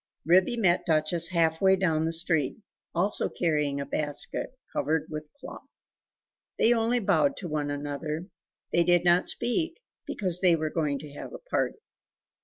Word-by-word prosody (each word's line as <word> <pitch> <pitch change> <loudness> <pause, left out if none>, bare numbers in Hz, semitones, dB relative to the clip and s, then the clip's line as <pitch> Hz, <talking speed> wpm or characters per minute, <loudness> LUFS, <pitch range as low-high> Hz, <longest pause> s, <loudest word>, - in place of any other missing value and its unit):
Ribby 185 +8 +4
met 185 -6 +2
Duchess 160 +1 +2
half 165 -2 +1
way 190 0 +5
own 160 -3 +2
the 165 - 0
street, 160 -4 0 0.4
also 195 +5 +1
carrying 150 -4 0
a 140 - -3
basket, 145 - -2 0.2
covered 155 0 0
with 150 0 -5
a 285 - -39
cloth. - - -10 0.9
They 235 - +4
only 230 +1 +1
bowed 245 +6 +2
to 185 - -6
one 150 -2 -2
another; 145 +3 -4 0.5
they 170 - +4
did 175 0 +3
not 175 +1 +4
speak, 325 - -1 0.3
because 180 -3 -1
they 180 -3 +5
were 155 -1 -2
going 150 -4 0
to 150 -2 -11
have 145 - -8
a - - -12
party. - - 0
170 Hz, 165 wpm, -27 LUFS, 155-190 Hz, 0.9 s, way